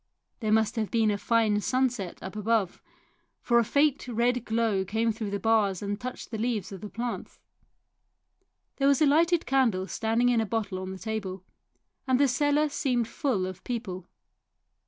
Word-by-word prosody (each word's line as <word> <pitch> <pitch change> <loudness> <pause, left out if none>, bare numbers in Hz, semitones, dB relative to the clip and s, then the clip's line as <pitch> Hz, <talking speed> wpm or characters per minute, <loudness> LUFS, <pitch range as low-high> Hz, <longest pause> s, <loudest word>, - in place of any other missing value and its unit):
There 215 -3 -1
must 220 +1 +2
have 215 -2 -1
been 225 -2 +2
a 205 - -1
fine 215 -1 +2
sunset 245 -7 -1
up 190 +2 -7
above, 215 -3 0 0.6
for 235 -1 +3
a - - +3
faint 285 +3 +1
red 240 +1 +1
glow 220 -3 +1
came 220 +4 0
through 220 -1 -4
the 200 0 -2
bars 210 -4 +2
and 205 +2 -3
touched 255 0 -6
the 220 - -4
leaves 220 -5 -2
of 190 -2 -8
the 210 - -7
plants. 235 +2 -5 1.4
There 275 - +2
was 280 -2 +4
a - - +6
lighted 330 +4 +3
candle 245 -8 +2
standing 225 +4 +1
in 235 -2 +3
a - - 0
bottle 205 -4 -2
on 185 0 -5
the 190 - -6
table, 195 -3 -4 0.6
and 260 -1 +3
the 285 - +5
cellar 290 +4 +2
seemed 255 -6 0
full 230 -6 -1
of 185 -1 -7
people. 190 -7 -5
225 Hz, 175 wpm, -27 LUFS, 205-250 Hz, 1.4 s, a